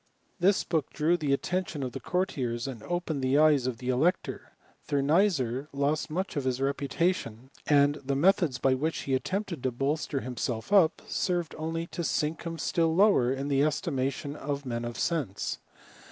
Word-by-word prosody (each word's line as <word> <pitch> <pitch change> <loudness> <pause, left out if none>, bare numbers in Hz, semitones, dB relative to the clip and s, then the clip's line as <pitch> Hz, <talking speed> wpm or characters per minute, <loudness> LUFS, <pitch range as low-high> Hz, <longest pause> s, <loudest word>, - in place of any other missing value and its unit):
This 190 +3 +3
book 160 -5 -1
drew 160 +3 +1
the 150 -5 -1
attention 170 +1 -1
of 130 - -3
the - - -6
cour 180 +1 0
tiers, 120 -7 -3
and 125 -5 -6
opened 170 -1 -2
the 130 +2 +2
eyes 150 -4 +4
of 125 -3 -2
the 125 +2 -5
elector. 150 +8 0 0.3
Thur 140 -1 +1
^ysser 145 - +2
lost 140 +2 0
much 185 +5 -3
of 140 -3 -2
his 130 -1 0
reputation; 140 -2 -1 0.2
and 145 -1 +5
the 135 +1 -1
methods 165 -3 +3
^ 130 0 +2
which 160 +3 -1
he 135 - -2
attempted 185 +3 -2
to 130 - +1
bolster 140 +3 -1
himself 125 - -3
up, 170 -5 +4
served 175 -3 -1
^ly 165 +1 -4
to 170 - -3
sink 155 0 -1
him 165 0 -4
still 165 -1 +1
lower 190 - +4
in 135 +1 -2
the 140 -1 +2
estimation 140 -1 -1
of 145 -1 -4
^n 120 -2 -3
of 120 - -6
sense. 135 - -2
145 Hz, 180 wpm, -28 LUFS, 130-165 Hz, 0.3 s, and